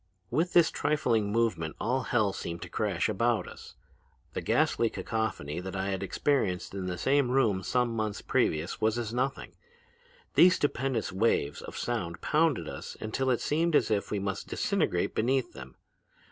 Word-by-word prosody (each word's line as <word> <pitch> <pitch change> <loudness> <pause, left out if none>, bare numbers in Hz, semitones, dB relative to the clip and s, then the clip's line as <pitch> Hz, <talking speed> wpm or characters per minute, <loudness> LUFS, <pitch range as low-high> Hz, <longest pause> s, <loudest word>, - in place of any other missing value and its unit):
"With 170 +3 +1
this 170 -2 +5
trifling 115 -9 +1
movement 110 -8 0
all 130 +3 0
hell 110 -6 +1
seemed 85 -2 -5
to - - -8
crash - - 0
about 115 -2 +1
us. - - -11 0.6
The - - -3
ghastly 115 - +2
cacophony 110 -12 -3
that 95 +1 -6
I 95 +1 -1
had 95 - -2
experienced 100 -3 0
in 95 -2 -4
the 90 0 -3
same 135 +4 +2
room 115 -7 +2
some 120 +3 0
months 110 -2 -2
previously 80 +3 0
was 110 +1 +2
as 115 -2 -3
nothing. 130 +2 -2 0.8
These 180 +1 +7
stupendous 135 -3 -1
waves 95 -8 +1
of - - -8
sound 95 -8 -3
pounded 150 - +1
us - - -7
until 130 +5 -1
it 125 - +1
seemed 165 +2 +1
as - - +3
if 100 -2 0
we 105 - -1
must 100 -1 -3
disintegrate - - 0
beneath 130 +3 0
them. 65 0 -10
110 Hz, 165 wpm, -29 LUFS, 95-130 Hz, 0.8 s, These